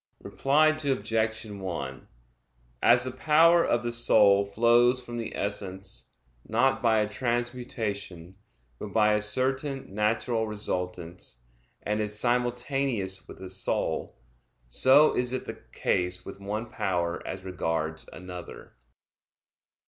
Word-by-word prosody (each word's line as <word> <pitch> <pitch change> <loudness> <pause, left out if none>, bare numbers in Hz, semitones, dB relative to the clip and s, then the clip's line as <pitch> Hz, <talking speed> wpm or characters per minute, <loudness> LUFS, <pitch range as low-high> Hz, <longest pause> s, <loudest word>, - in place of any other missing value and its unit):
Reply 150 +3 +3
Obj. 115 -7 -1
1: 90 -10 -6 0.7
As 120 +1 +5
the 130 - -2
power 165 +6 +5
of 120 - +1
the 120 - -2
soul 105 -4 +4
flows 120 +4 +4
from 120 -1 -6
the 115 - -5
essence, 95 -1 -3 0.4
not 130 +4 +2
by 110 -2 +3
a 105 - 0
transmutation, 115 -6 -3 0.4
but 100 - -7
by 105 -1 +4
a 105 - +1
certain 130 +3 0
natural 110 +2 0
resultance, 90 - -5 0.4
and 105 +1 -1
is 105 0 -2
simultaneous 120 -4 -1
with - - -11
the 95 - -8
soul, 95 +1 -2 0.5
so 130 - +5
is 125 0 0
it 130 - -3
the - - -8
case 90 0 0
with - - -9
one 105 +3 -4
power 85 -2 -1
as 95 0 -6
regards 80 -4 -3
another. 90 0 -10
110 Hz, 120 wpm, -27 LUFS, 95-125 Hz, 0.7 s, As